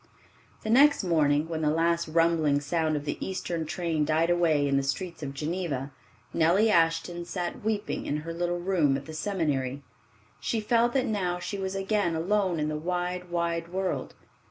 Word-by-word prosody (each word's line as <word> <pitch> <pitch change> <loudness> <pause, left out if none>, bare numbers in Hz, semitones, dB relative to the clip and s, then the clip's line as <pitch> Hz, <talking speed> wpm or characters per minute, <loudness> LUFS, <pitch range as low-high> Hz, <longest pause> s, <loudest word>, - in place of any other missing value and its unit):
The 220 - -1
next 285 +1 +6
morning 155 -3 +2
when 160 -1 -3
the 150 - +2
last 170 +2 +1
rumbling 160 -3 +3
sound 155 +1 0
of 145 0 -3
the 145 - -3
eastern 175 -4 -3
train 165 -2 -1
died 160 +3 +2
away 160 -5 +3
in 140 - +1
the 140 - +3
streets 160 +5 -3
of 140 -2 -5
Geneva, 150 -3 -3 0.4
Nellie 180 +7 +4
Ashton 165 0 +2
sat 175 +1 -4
weeping 215 -1 -2
in 145 - 0
her 165 - -4
little 175 +1 -1
room 175 -7 +2
at 140 - -9
the 160 - -8
seminary. 145 -7 -1 0.6
She 230 - -1
felt 235 +2 +2
that 265 -2 +2
now 190 -6 -1
she 195 +3 -5
was 190 0 -3
again 195 -3 0
alone 185 0 +1
in 150 - 0
the 155 0 -2
wide, 180 +2 -3
wide 170 -1 -1
world. 185 +2 -3
170 Hz, 180 wpm, -28 LUFS, 155-185 Hz, 0.6 s, next